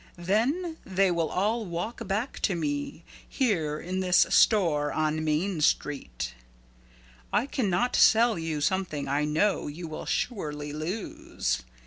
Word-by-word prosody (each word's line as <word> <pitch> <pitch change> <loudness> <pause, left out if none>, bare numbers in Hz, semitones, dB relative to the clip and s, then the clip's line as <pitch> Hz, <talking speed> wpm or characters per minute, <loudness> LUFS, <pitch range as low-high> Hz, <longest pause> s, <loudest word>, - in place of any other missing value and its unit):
Then 260 - 0
they 190 0 +2
will 170 -2 0
all 215 +5 0
walk 200 +5 -5
back 210 +8 -2
to 195 - +1
me 150 0 -3 0.3
here 160 - 0
in 185 +2 -3
this 180 -1 +4
store 160 -9 +4
on 155 0 0
main 155 +3 0
street. 100 - -1 1.0
I 235 - +2
can 255 -6 -1
not 190 +8 +1
sell 225 -3 +5
you 160 -2 -3
something 155 -4 -1
I 145 +2 +1
know 160 +7 +1
you 165 +4 -6
will 155 - -7
surely 150 - -2
lose. 155 - -3
175 Hz, 135 wpm, -27 LUFS, 150-210 Hz, 1.0 s, sell